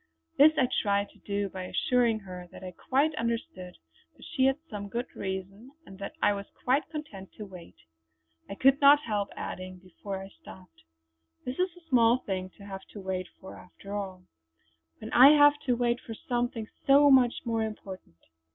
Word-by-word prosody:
This 300 +2 +9
I 255 - +3
tried 200 -1 0
to - - -23
do 200 0 -2
by 185 0 -6
assuring 235 +2 +1
her 180 -2 -9
that - - -12
I 185 - -6
quite 280 - 0
understood 225 -6 -4 0.4
that - - -14
she 260 - 0
had 270 +1 +3
some 205 -4 -7
good 240 +4 -3
reason, 195 +4 -6 0.2
and 195 0 -13
that 200 - -7
I 205 - +4
was 200 0 -6 0.2
quite 265 +4 +1
content 260 - -8
to 210 - -8
wait. 180 -3 -12 0.7
I 195 - -5
could 270 +5 +4
not 290 +1 +7
help 205 -3 -2
adding 185 0 -6
before 190 +2 -8
I 195 0 -9
stopped: 185 - -16 0.6
"This 250 +5 -5
is 365 -1 -1
a 340 -2 -19
small 240 -4 +4
thing 190 -6 -4
to 200 - -13
have 195 -1 -7
to 210 - -8
wait 185 -1 -4
for 190 - -11
after 195 +2 -12
all; 190 -3 -5 0.7
when 220 - -9
I 270 +4 +9
have 290 0 +6
to 250 - +3
wait 240 0 0
for 225 - -8
something 240 -2 -3 0.2
so 285 +1 +7
much 250 -3 +5
more 230 -1 0
important." 195 - -7
210 Hz, 185 wpm, -28 LUFS, 190-255 Hz, 0.7 s, This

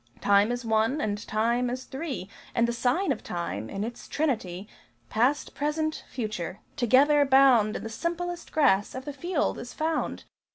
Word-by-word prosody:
Time 205 +2 +4
is 245 0 -3
one, 225 +5 +2
and 210 -5 -2
Time 235 +3 +1
is 255 +1 -4
three: 265 - -5 0.3
And 235 0 +3
the 235 - -1
sign 255 +11 +1
of - - -3
Time, 170 - -4
in 195 - -3
its 235 +2 -6
Trinity 210 - -2 0.4
Past, 255 +7 +1
Present, 310 +2 -1
Future, 215 -6 -4 0.2
together 285 +3 +5
bound 265 -6 +5
In - - -4
the 225 - -5
simplest 345 +7 -4
grass 250 -11 +3
of 260 0 -6
the 290 - -5
field 340 +2 -1
is 245 - -8
found! 320 +1 -1
245 Hz, 165 wpm, -27 LUFS, 215-295 Hz, 0.4 s, together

